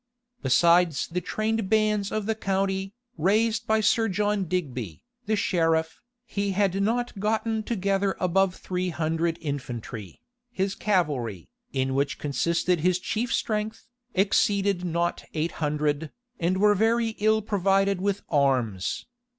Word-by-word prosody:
Besides 170 +3 +4
the 180 +2 -2
trained 215 -1 -1
bands 215 -2 +2
of 215 -2 -2
the 220 - +1
county, 195 -1 -1 0.2
raised 220 +6 +2
by 220 0 +3
Sir 225 +2 +3
John 205 0 0
Digby, 135 - -3 0.2
the 215 - +2
sheriff, 165 -5 +1 0.2
he 200 -3 -2
had 195 0 +1
not 235 +1 -1
gotten 220 +1 0
together 200 -3 0
above 185 +1 +2
three 180 0 -3
hundred 165 0 -1
infantry. 125 - -5 0.3
His 195 -3 -1
cavalry, 135 - -1 0.2
in 130 -1 0
which 140 +1 0
consisted 170 +5 0
his 180 +2 +2
chief 225 +6 -2
strength, 215 0 -2 0.3
exceeded 195 -1 +2
not 170 0 -1
eight 160 +2 0
hundred, 150 0 0 0.3
and 180 +2 +1
were 205 +1 +5
very 225 +3 +2
ill 215 0 +3
provided 195 -1 +2
with 200 0 -1
arms. 130 - 0
190 Hz, 130 wpm, -26 LUFS, 160-210 Hz, 0.3 s, were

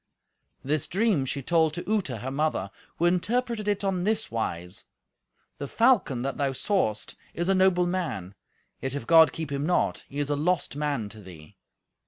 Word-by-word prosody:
This 150 +2 -1
dream 195 -8 +1
she 140 +1 -3
told 160 0 +2
to 175 - -6
Uta, 195 - 0
her 130 +5 -5
mother, 140 -9 -1 0.3
who 170 - +1
interpreted 215 +5 0
it 205 -1 0
on 190 -2 0
this 220 +2 0
wise. 90 -5 -4 0.7
"The 140 - -4
falcon 215 - +2
that 135 - -3
thou 140 -2 0
sawest 130 - -1 0.2
is 175 +2 -1
a - - +5
noble 185 -2 +4
man; 165 - -3 0.5
yet 135 +1 -2
if 140 - -4
God 165 +1 +7
keep 160 -3 -5
him 140 +2 -1
not, 180 - +1
he 140 - -8
is 145 0 -1
a - - +2
lost 155 -1 0
man 145 -7 -1
to 110 +1 -12
thee." 85 -6 -13
155 Hz, 180 wpm, -27 LUFS, 130-185 Hz, 0.7 s, God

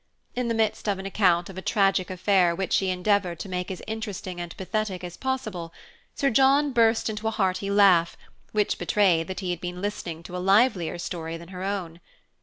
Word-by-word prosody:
In 250 -1 -1
the 230 - 0
midst 220 -1 0
of 200 - 0
an 190 - -7
account 180 -3 +2
of 190 -1 -7
a - - -7
tragic 195 -2 +2
affair 185 -2 +2
which 190 +1 -2
she 190 - +2
endeavored 185 -1 +1
to 195 - -6
make 180 -1 -3
as 190 - -6
interesting 205 -5 -5
and 175 -1 -8
pathetic 190 -1 -3
as 175 -1 -6
possible, 215 -11 -3 0.4
Sir 275 -2 +1
John 275 +4 +4
burst 230 -2 +3
into 220 0 -3
a - - +3
hearty 195 -2 -1
laugh, 195 -4 +4 0.3
which 210 -1 0
betrayed 175 -6 +2
that 190 +1 -5
he 185 -2 -2
had 175 0 -4
been 180 0 -5
listening 180 -5 -4
to 175 - -8
a - - -2
livelier 195 -2 +3
story 165 -1 -5
than 170 +1 -12
her 185 -1 -7
own. 185 -4 -3
190 Hz, 205 wpm, -26 LUFS, 180-215 Hz, 0.4 s, John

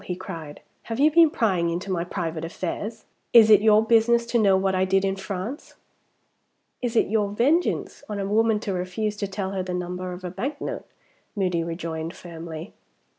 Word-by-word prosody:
he 180 - -3
cried, 155 -4 -8 0.2
"have 225 +1 -5
you 300 +2 +5
been 330 0 +6
prying 190 - +1
into 175 +3 -3
my 170 -2 0
private 165 -3 -4
affairs? 185 +6 -5 0.3
Is 225 -2 +8
it 210 - +8
your 215 0 +5
business 235 +1 +4
to 235 0 +1
know 195 -3 +4
what 190 0 +1
I 185 0 +2
did 195 +1 +2
in 195 0 0
France?" 195 +7 -6 1.1
"Is 245 -1 -2
it - - +4
your 210 -1 0
vengeance 275 - 0
on 210 - -3
a 195 - -2
woman 220 +1 +2
to 205 -3 -3
refuse 185 +4 -2
to 200 - -2
tell 195 0 -4
her 195 -1 -2
the 180 -1 -4
number 180 +1 -4
of 180 +1 -8
a 180 - -4
bank 270 - -4
note?" - - -5 0.5
Moody 180 -4 0
rejoined, 165 0 -5
firmly. 165 0 -8
195 Hz, 190 wpm, -24 LUFS, 180-225 Hz, 1.1 s, Is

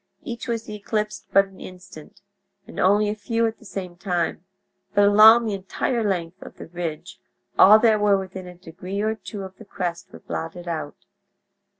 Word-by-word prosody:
Each 235 0 -6
was 230 -1 -3
eclipsed 210 0 -4
but 195 0 +5
an 195 -1 -17
instant, 180 -3 -12 0.4
and - - -10
only 205 +3 +3
a - - -1
few 230 +2 -1
at 225 0 -3
the - - -18
same 185 -3 -6
time, 175 -2 -2 0.5
but 205 - +5
along 220 +3 +8
the 215 - -1
entire 200 +5 -2
length 185 -3 -2
of - - -12
the - - -9
ridge 165 -2 -6 0.4
all 210 +3 +9
that 220 -1 +3
were 205 -1 +4
within 190 -1 -7
a 180 - -10
degree 185 +3 -6
or 215 +1 0
two 215 -2 -8
of 190 0 -10
the 220 - -13
crest 180 -3 -5
were - - -11
blotted 175 +2 -6
out. 155 -3 -5
195 Hz, 185 wpm, -23 LUFS, 180-215 Hz, 0.5 s, all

